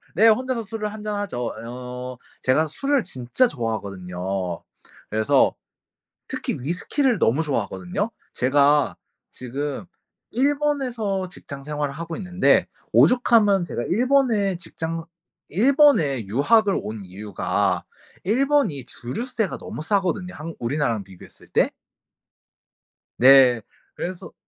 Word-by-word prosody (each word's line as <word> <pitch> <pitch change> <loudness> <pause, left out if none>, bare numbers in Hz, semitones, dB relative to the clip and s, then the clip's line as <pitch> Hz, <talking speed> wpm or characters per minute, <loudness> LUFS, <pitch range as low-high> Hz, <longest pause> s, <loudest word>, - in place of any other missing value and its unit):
네. 220 +5 +6
혼자서 255 +2 +2
술을 215 0 -4
한 215 -1 -8
잔하죠. 205 - -3 0.2
어 125 +1 -7 0.3
제가 155 +5 +3
술을 275 - 0
진짜 135 - +1
좋아하거든요. 95 - -4 0.5
그래서 110 0 +3 0.7
특히 - - -3
위스키를 185 - 0
너무 130 +8 +3
좋아하거든요. 180 - -2 0.2
제가 140 +2 +3 0.3
지금 140 +6 -5 0.5
일본에서 255 -7 0
직장 140 -6 -9
생활을 145 -1 -3
하고 165 +1 -6
있는데 180 0 +2 0.3
오죽하면 220 -6 +5
제가 120 - -4
일본에 230 - +2
직장 165 -2 -5 0.4
일본에 210 - +4
유학을 195 - +3
온 110 -1 -6
이유가 95 +2 -1 0.4
일본이 225 - +1
주류세가 220 - -3
너무 - - -7
싸거든요. 185 +1 0
한 165 +1 -7
우리나라랑 120 -4 -1
비교했을 95 -2 -14
때. - - +2 1.5
네. 130 -2 +7 0.3
그래서 185 +1 -6
165 Hz, 260 characters per minute, -23 LUFS, -, 1.5 s, 네